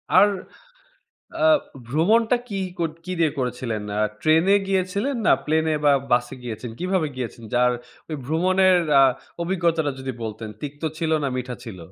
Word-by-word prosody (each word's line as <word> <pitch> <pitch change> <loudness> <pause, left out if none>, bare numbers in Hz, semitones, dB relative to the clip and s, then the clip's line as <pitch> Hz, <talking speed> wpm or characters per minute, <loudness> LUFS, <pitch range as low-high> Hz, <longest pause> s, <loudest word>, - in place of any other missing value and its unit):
আর, 190 +3 +8 1.1
অ্যা 320 -1 +2 0.4
ভ্রমণটা 220 - +3
কি 200 - -3 0.2
কত 165 -2 0
কি 185 - -4
দিয়ে 160 -3 +3
করেছিলেন? 125 -4 -2 0.2
আ - - +2 0.2
ট্রেন 160 +1 +4
এ - - +7
গিয়েছিলেন 195 +8 0
না - - +6
প্লেনে 160 0 +1
বা 145 - +6 0.2
বাসে 120 0 +2
গিয়েছেন? 120 0 -6
কিভাবে 185 -2 0
গিয়েছেন 120 -2 -5
যার 125 0 +4 0.4
ওই 155 - -3
ভ্রমনের 185 +5 +3 0.2
অ্যা 135 -1 +7 0.4
অভিজ্ঞতাটা 170 -4 +1
যদি 130 0 -4
বলতেন 110 0 -5
তিক্ত 145 +1 -7 0.2
ছিল 165 -1 -1
না 140 - +1
মিঠা 125 0 -4
ছিল? 110 -5 -8
155 Hz, 155 wpm, -23 LUFS, 125-185 Hz, 1.1 s, আর